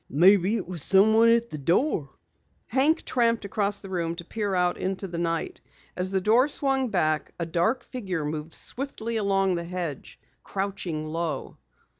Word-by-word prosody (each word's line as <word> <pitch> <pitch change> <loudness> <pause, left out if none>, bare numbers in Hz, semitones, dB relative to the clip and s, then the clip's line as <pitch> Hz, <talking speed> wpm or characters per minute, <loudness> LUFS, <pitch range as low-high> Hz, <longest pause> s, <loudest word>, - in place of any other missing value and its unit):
"Maybe 190 - +5
it 200 -7 -3
was 175 -3 -3
someone 220 +6 +5
at 235 0 +2
the 150 - -5
door." 165 - +1 0.6
Hank 280 +7 +2
tramped 230 -3 +1
across 200 0 0
the 195 - -10
room 170 -2 -2
to 170 0 -8
peer 205 -1 -2
out 180 -1 +1
into 190 +1 -3
the 170 -2 -5
night. 165 -1 -2 0.3
As 185 +1 -1
the 190 0 +1
door 225 +8 +4
swung 270 -3 0
back, 155 -6 0
a 170 - -2
dark 180 +10 0
figure 190 - -4
moved 155 +1 -5
swiftly 235 -4 -3
along 195 -2 +2
the 170 -1 -2
hedge, 170 -5 -6 0.2
crouching 190 -5 -3
low. 165 +1 -4
190 Hz, 165 wpm, -26 LUFS, 170-225 Hz, 0.6 s, Maybe